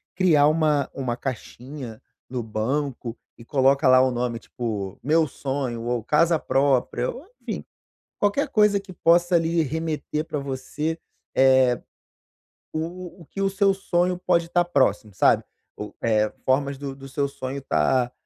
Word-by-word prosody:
criar 165 Hz, -6 st, +4 dB
uma 155 Hz, -2 st, +2 dB
uma 130 Hz, -3 st, -2 dB
caixinha 125 Hz, -1 st, -7 dB, 0.3 s
no 125 Hz, -1 st, -3 dB
banco 120 Hz, +2 st, -2 dB, 0.2 s
e 115 Hz, -, -14 dB
coloca 135 Hz, +2 st, +3 dB
lá 130 Hz, 0 st, +7 dB
o 130 Hz, -, +3 dB
nome, 120 Hz, -1 st, -2 dB
tipo, 105 Hz, -6 st, -5 dB
meu 160 Hz, +3 st, +3 dB
sonho, 130 Hz, -3 st, -3 dB
ou 120 Hz, -1 st, -1 dB
casa 160 Hz, +6 st, +3 dB
própria, 135 Hz, -3 st, +1 dB
ou 300 Hz, -, -11 dB
enfim, -, -, -5 dB, 0.6 s
qualquer 205 Hz, +8 st, +1 dB
coisa 210 Hz, -4 st, +4 dB
que 195 Hz, -1 st, -12 dB
possa, 175 Hz, +1 st, +3 dB
ali, 165 Hz, 0 st, +2 dB
remeter 155 Hz, +1 st, -3 dB
pra 150 Hz, -, -3 dB
você, 140 Hz, +4 st, -4 dB, 0.4 s
eh, 130 Hz, -2 st, +5 dB, 0.9 s
o 175 Hz, +3 st, -5 dB
o -, -, -13 dB
que 195 Hz, -, -6 dB
o 195 Hz, -, +2 dB
seu 195 Hz, 0 st, +2 dB
sonho 180 Hz, -2 st, 0 dB
pode 170 Hz, -2 st, +1 dB
tá 175 Hz, 0 st, +2 dB
próximo 110 Hz, -, +1 dB
sabe, 90 Hz, -, +4 dB, 0.4 s
o 105 Hz, -, -7 dB
é 110 Hz, -2 st, +2 dB, 0.2 s
formas 140 Hz, +1 st, +1 dB
do 140 Hz, 0 st, -5 dB
do 135 Hz, 0 st, -11 dB
seu 140 Hz, +1 st, -1 dB
sonho 135 Hz, 0 st, -5 dB
tá, 120 Hz, -, +1 dB
140 Hz, 150 wpm, -24 LUFS, 125-165 Hz, 0.9 s, lá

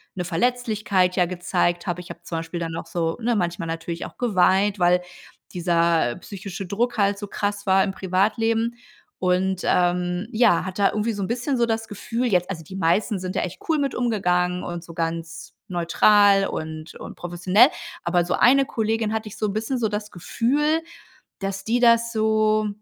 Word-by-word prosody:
'ne 180 Hz, -, -3 dB
Verletzlichkeit 205 Hz, -1 st, 0 dB
ja 180 Hz, -, +3 dB
gezeigt 175 Hz, 0 st, -1 dB
habe. 175 Hz, 0 st, -2 dB
Ich 175 Hz, -, -13 dB
habe -, -, -8 dB
zum 165 Hz, -1 st, -4 dB
Beispiel 165 Hz, +1 st, -5 dB
dann 165 Hz, -1 st, -4 dB
noch 165 Hz, 0 st, -6 dB
so 165 Hz, -1 st, -2 dB
ne, 235 Hz, -1 st, +1 dB
manchmal 170 Hz, -2 st, -2 dB
natürlich 165 Hz, +1 st, -4 dB
auch -, -, -11 dB
geweint, 200 Hz, -2 st, +2 dB
weil 180 Hz, 0 st, +4 dB, 0.5 s
dieser 170 Hz, -6 st, +2 dB
psychische 195 Hz, 0 st, -7 dB
Druck 235 Hz, +6 st, -1 dB
halt 200 Hz, -1 st, +2 dB
so 205 Hz, -, -6 dB
krass 205 Hz, 0 st, -3 dB
war 190 Hz, 0 st, +5 dB
im 195 Hz, -, -1 dB
Privatleben 225 Hz, +5 st, 0 dB, 0.4 s
und, 185 Hz, 0 st, +1 dB
ähm, 180 Hz, +2 st, +1 dB
ja, 220 Hz, -6 st, +3 dB
hatte 190 Hz, +2 st, -3 dB
da -, -, +5 dB
irgendwie 215 Hz, +2 st, -1 dB
so 200 Hz, -, -5 dB
'n 185 Hz, -, -2 dB
bisschen 250 Hz, +3 st, -1 dB
so 235 Hz, -, +3 dB
das 225 Hz, 0 st, -2 dB
Gefühl 230 Hz, +4 st, -3 dB
jetzt 180 Hz, -4 st, +1 dB
also 165 Hz, -4 st, -5 dB
die 170 Hz, +5 st, -10 dB
meisten 195 Hz, +4 st, +1 dB
sind 185 Hz, +1 st, -5 dB
ja -, -, +1 dB
echt 180 Hz, -, -6 dB
cool 320 Hz, -, +3 dB
mit 280 Hz, -2 st, -1 dB
umgegangen 180 Hz, -6 st, 0 dB
und 175 Hz, -1 st, -5 dB
so 170 Hz, -, -11 dB
ganz 165 Hz, 0 st, -4 dB
neutral 195 Hz, +3 st, +4 dB
und 155 Hz, 0 st, -6 dB
und -, -, -9 dB
professionell, 180 Hz, +6 st, +3 dB, 0.4 s
aber 175 Hz, 0 st, +2 dB
so 175 Hz, -, -1 dB
eine 270 Hz, +2 st, +5 dB
Kollegin 220 Hz, -2 st, -1 dB
hatte 220 Hz, -1 st, -3 dB
ich 210 Hz, -, -11 dB
so 215 Hz, -, 0 dB
'n 200 Hz, -, -3 dB
bisschen 225 Hz, +5 st, -2 dB
so 225 Hz, -3 st, 0 dB
das 210 Hz, 0 st, -4 dB
Gefühl, 290 Hz, -, 0 dB, 0.6 s
dass 195 Hz, 0 st, -4 dB
die 235 Hz, +2 st, +1 dB
das 235 Hz, 0 st, +4 dB
so, 215 Hz, -1 st, +2 dB
195 Hz, 190 wpm, -23 LUFS, 175-220 Hz, 0.6 s, war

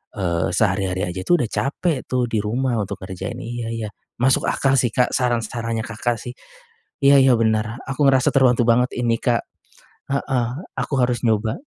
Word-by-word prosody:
eee, 85 Hz, -5 st, 0 dB
sehari-hari 95 Hz, -3 st, 0 dB
aja 95 Hz, +1 st, -5 dB
itu 175 Hz, -, +5 dB
udah 120 Hz, -6 st, -1 dB
capek 145 Hz, +1 st, -1 dB
tuh 125 Hz, -1 st, 0 dB
di 110 Hz, -, 0 dB
rumah 115 Hz, +3 st, -1 dB
untuk 100 Hz, -, -4 dB
kerjain, 95 Hz, +1 st, -6 dB
iya 120 Hz, 0 st, -5 dB
iya. 115 Hz, -2 st, -4 dB, 0.3 s
Masuk 130 Hz, +1 st, +3 dB
akal 135 Hz, -1 st, +2 dB
sih, 120 Hz, -3 st, 0 dB
Kak, 125 Hz, -, +2 dB
saran-sarannya 115 Hz, -2 st, -1 dB
Kakak 115 Hz, +2 st, -2 dB
sih. 125 Hz, -, -7 dB, 0.7 s
Iya 140 Hz, -1 st, +7 dB
iya 130 Hz, -1 st, +5 dB
bener 110 Hz, 0 st, 0 dB
aku 135 Hz, +2 st, +1 dB
ngerasa 135 Hz, +2 st, +3 dB
terbantu 125 Hz, -3 st, +4 dB
banget 125 Hz, +2 st, +4 dB
ini, 115 Hz, -2 st, +1 dB
Kak, 120 Hz, -3 st, +1 dB, 0.7 s
heeh, 135 Hz, -3 st, 0 dB, 0.3 s
aku -, -, -3 dB
harus 125 Hz, -1 st, +1 dB
nyoba. 110 Hz, -, +1 dB
120 Hz, 170 wpm, -21 LUFS, 110-130 Hz, 0.7 s, Iya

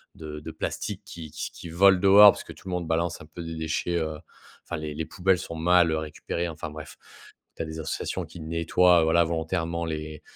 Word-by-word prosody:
de 75 Hz, -1 st, -7 dB
de -, -, -8 dB
plastique -, -, -4 dB
qui 80 Hz, -3 st, -9 dB
q 80 Hz, -, -5 dB
qui 85 Hz, -, -9 dB
volent 95 Hz, +2 st, +5 dB
dehors, 100 Hz, +1 st, +9 dB
parce -, -, -8 dB
que -, -, -10 dB
tout -, -, -15 dB
le 95 Hz, -, -4 dB
monde 85 Hz, -2 st, -2 dB
balance 80 Hz, +1 st, -1 dB
un -, -, -10 dB
peu 80 Hz, +2 st, -10 dB
des 80 Hz, 0 st, -6 dB
déchets, 80 Hz, +2 st, -2 dB
heu, 80 Hz, -2 st, -3 dB, 0.5 s
enfin, -, -, -4 dB
les 75 Hz, -1 st, -5 dB
les 80 Hz, -, -3 dB
poubelles 90 Hz, +3 st, +1 dB
sont 85 Hz, -, -6 dB
mal, 85 Hz, +1 st, +4 dB
heu, 80 Hz, -, +1 dB
récupérées. 80 Hz, +2 st, -4 dB
Enfin 80 Hz, +1 st, -6 dB
bref, 75 Hz, 0 st, -10 dB, 0.6 s
tu -, -, -3 dB
as -, -, -5 dB
des 80 Hz, 0 st, -7 dB
associations 80 Hz, -, -3 dB
qui 85 Hz, -, -12 dB
nettoient, 85 Hz, +2 st, +3 dB
voilà, 85 Hz, +2 st, +4 dB
volontairement 85 Hz, +1 st, -2 dB
les 75 Hz, -1 st, -5 dB
80 Hz, 220 wpm, -26 LUFS, 80-85 Hz, 0.6 s, dehors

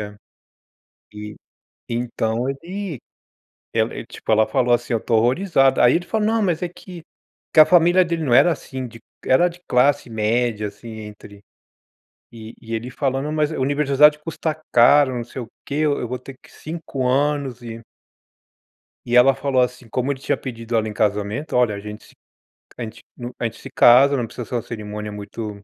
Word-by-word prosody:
É, 105 Hz, 0 st, -7 dB, 1.0 s
e 105 Hz, 0 st, -8 dB, 0.5 s
então 115 Hz, -1 st, -2 dB
ele 170 Hz, -, -6 dB, 0.8 s
ela -, -, +1 dB
ele -, -, -7 dB
tipo, -, -, -8 dB
ela 110 Hz, 0 st, +4 dB
falou 125 Hz, -3 st, +1 dB
assim, 120 Hz, 0 st, -2 dB
ó: 115 Hz, -, 0 dB
"Tô 115 Hz, -, +1 dB
horrorizada". 135 Hz, -, +3 dB
Aí 120 Hz, -, +5 dB
ele 175 Hz, -, -4 dB
falou: 215 Hz, -1 st, 0 dB
"Não, 225 Hz, 0 st, +1 dB
mas 180 Hz, -3 st, 0 dB
é 180 Hz, -, -1 dB
que" 175 Hz, 0 st, -12 dB, 0.5 s
que -, -, -1 dB
a 155 Hz, -, +9 dB
família 175 Hz, +1 st, +5 dB
dele 170 Hz, -1 st, -2 dB
não 130 Hz, -5 st, -1 dB
era 145 Hz, +7 st, +6 dB
assim 130 Hz, -4 st, -6 dB
de 115 Hz, -1 st, -13 dB, 0.3 s
era 175 Hz, +8 st, +4 dB
de 175 Hz, 0 st, -13 dB
classe 135 Hz, +1 st, +2 dB
média, 110 Hz, 0 st, -1 dB
assim, 105 Hz, +3 st, -13 dB
entre 105 Hz, -1 st, -12 dB, 0.9 s
e 110 Hz, -1 st, -10 dB
e 115 Hz, 0 st, -9 dB
ele 120 Hz, +3 st, -4 dB
falando: 135 Hz, +2 st, -2 dB
"Mas 155 Hz, -1 st, 0 dB
universidade 145 Hz, +1 st, +3 dB
custa 160 Hz, -1 st, -4 dB
caro, 130 Hz, +3 st, +5 dB
não 120 Hz, -, -3 dB
sei 125 Hz, +2 st, -7 dB
o 115 Hz, -, -10 dB, 0.2 s
que, 140 Hz, -, -5 dB
eu 150 Hz, -1 st, +1 dB
eu 120 Hz, -, -4 dB
vou 125 Hz, -, -4 dB
ter 130 Hz, +2 st, -11 dB
que -, -, -19 dB
5 155 Hz, -5 st, -5 dB
anos 135 Hz, -1 st, 0 dB
e" 115 Hz, -1 st, -7 dB, 1.3 s
E 120 Hz, -, -1 dB
ela 125 Hz, +2 st, +7 dB
falou, 130 Hz, -2 st, 0 dB
assim, 125 Hz, -1 st, -2 dB
como 130 Hz, +5 st, -1 dB
ele 135 Hz, -, -5 dB
tinha -, -, -1 dB
pedido 115 Hz, -2 st, -5 dB
ela 110 Hz, -1 st, +1 dB
em 105 Hz, -, -5 dB
casamento: 105 Hz, +7 st, -1 dB
"Olha 120 Hz, -4 st, +2 dB
a -, -, -6 dB
gente 105 Hz, +1 st, -9 dB
se -, -, -20 dB, 0.6 s
a -, -, -4 dB
gente 110 Hz, -, -8 dB, 0.2 s
hum, 120 Hz, 0 st, -6 dB
a -, -, -3 dB
gente 115 Hz, -, -4 dB
se 135 Hz, -, -10 dB
casa, 135 Hz, +3 st, +6 dB
não 125 Hz, -, -1 dB
precisa 120 Hz, -, -7 dB
ser -, -, -7 dB
uma 120 Hz, -, -1 dB
cerimônia 105 Hz, -2 st, -7 dB
muito" 105 Hz, 0 st, -7 dB
125 Hz, 190 wpm, -21 LUFS, 115-145 Hz, 1.3 s, a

